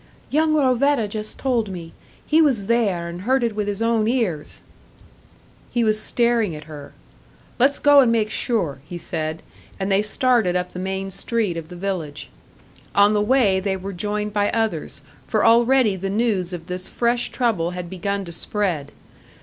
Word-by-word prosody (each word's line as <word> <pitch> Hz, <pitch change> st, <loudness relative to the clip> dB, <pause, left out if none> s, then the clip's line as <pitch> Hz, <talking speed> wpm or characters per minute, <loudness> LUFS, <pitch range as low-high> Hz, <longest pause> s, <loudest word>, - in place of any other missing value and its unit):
"Young 310 Hz, +1 st, +2 dB
Rovetta 265 Hz, -3 st, +2 dB
just 215 Hz, +1 st, -6 dB
told 240 Hz, -6 st, 0 dB
me. 170 Hz, -3 st, -8 dB, 0.3 s
He 315 Hz, +1 st, +4 dB
was 255 Hz, -10 st, +3 dB
there, 200 Hz, -7 st, +1 dB
and 170 Hz, +1 st, -7 dB
heard 255 Hz, +5 st, +1 dB
it 230 Hz, -2 st, 0 dB
with 210 Hz, -1 st, -2 dB
his 205 Hz, +2 st, -1 dB
own 230 Hz, -2 st, +2 dB
ears." 220 Hz, -, -2 dB, 1.1 s
He 240 Hz, -, 0 dB
was 215 Hz, -1 st, +2 dB
staring 235 Hz, -7 st, +1 dB
at 150 Hz, -, -9 dB
her. 150 Hz, -2 st, -11 dB, 0.7 s
"Let's 275 Hz, +3 st, +4 dB
go 290 Hz, -1 st, +6 dB
and 250 Hz, -4 st, +5 dB
make 220 Hz, -2 st, +1 dB
sure," 175 Hz, -, -1 dB
he 175 Hz, +4 st, -8 dB
said, 160 Hz, -1 st, -4 dB, 0.4 s
and 195 Hz, +1 st, -2 dB
they 195 Hz, +1 st, +4 dB
started 225 Hz, -4 st, +2 dB
up 180 Hz, 0 st, -2 dB
the 180 Hz, -, -6 dB
main 190 Hz, +1 st, -3 dB
street 205 Hz, -1 st, -1 dB
of 165 Hz, -1 st, -7 dB
the 180 Hz, -, -9 dB
village. 175 Hz, -6 st, -5 dB, 0.6 s
On 205 Hz, +1 st, +5 dB
the 210 Hz, -, +2 dB
way 210 Hz, -4 st, +3 dB
they 190 Hz, 0 st, -1 dB
were 195 Hz, +1 st, -6 dB
joined 210 Hz, +3 st, -3 dB
by 205 Hz, -1 st, +1 dB
others 225 Hz, -1 st, -2 dB, 0.3 s
for -, -, +1 dB
already 235 Hz, -1 st, +4 dB
the 190 Hz, +1 st, -4 dB
news 200 Hz, -4 st, 0 dB
of 175 Hz, -2 st, -6 dB
this 180 Hz, 0 st, -3 dB
fresh 240 Hz, 0 st, 0 dB
trouble 220 Hz, -10 st, 0 dB
had 180 Hz, -1 st, -5 dB
begun 195 Hz, +2 st, -3 dB
to 170 Hz, -, -8 dB
spread. 170 Hz, -5 st, -2 dB
205 Hz, 175 wpm, -22 LUFS, 180-235 Hz, 1.1 s, go